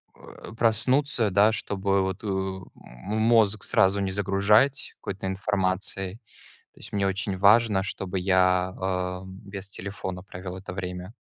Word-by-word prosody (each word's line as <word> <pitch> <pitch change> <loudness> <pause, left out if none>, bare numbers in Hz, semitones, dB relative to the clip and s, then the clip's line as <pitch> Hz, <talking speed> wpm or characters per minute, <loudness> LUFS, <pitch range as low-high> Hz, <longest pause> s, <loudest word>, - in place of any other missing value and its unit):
э, - - -12
проснуться, 115 +1 +2
да, 100 +3 +5
чтобы 100 -2 0
вот, 95 +1 -3
э, - - -4
м 95 - -5
мозг 110 -2 +3
сразу 95 +1 +3
не 95 -1 -1
загружать 105 +7 +2
какой-то 95 0 -5
информацией. 95 0 -2 0.6
То - - -21
есть, - - -11
мне 100 -1 +1
очень 95 0 -2
важно, 105 0 +5
чтобы 95 -1 -3
я, 90 0 +2
а, 90 -1 -2
без 100 +1 -8
телефона 95 -1 -6
провел 90 -1 -8
это 95 -1 -8
время. 90 +1 -6
95 Hz, 140 wpm, -26 LUFS, 95-105 Hz, 0.6 s, да